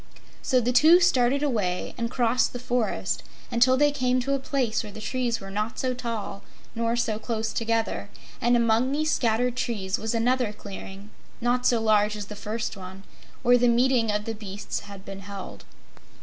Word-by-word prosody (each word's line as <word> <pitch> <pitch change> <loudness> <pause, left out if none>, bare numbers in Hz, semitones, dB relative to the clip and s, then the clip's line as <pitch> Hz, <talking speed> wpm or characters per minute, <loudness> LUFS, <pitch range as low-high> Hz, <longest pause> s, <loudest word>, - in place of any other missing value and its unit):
So 255 - +2
the 245 +1 +1
two 315 +8 +7
started 275 -5 +3
away 205 -10 -1
and 235 -1 -2
crossed 245 0 +1
the - - -3
forest 245 -2 -1 0.3
until 245 +2 +4
they 290 +1 +4
came 255 -3 +1
to 275 +3 -1
a 275 - +1
place 260 -4 0
where 210 - -8
the 210 - -9
trees 240 +1 -1
were 195 -1 -9
not 210 +4 -2
so 255 -1 0
tall 230 -5 -5 0.3
nor 230 0 0
so 225 -3 -1
close 220 -1 -3
together, 230 0 -1 0.3
and 240 0 +4
among 230 +2 +2
these 310 +2 0
scattered 240 +1 +1
trees 205 -6 -2
was 220 +1 -2
another 240 -1 +1
clearing, 200 0 -9 0.3
not 245 +1 +1
so 235 - +3
large 215 -1 +3
as 205 - -5
the 210 - -9
first 220 +2 -4
one, 190 0 -10 0.4
where 245 0 +5
the 245 - +4
meeting 240 -1 +3
of 210 0 -1
the 225 - -3
beasts 205 -2 -5
had 200 -1 -11
been 195 0 -7
held. 195 0 -9
230 Hz, 185 wpm, -26 LUFS, 210-250 Hz, 0.4 s, two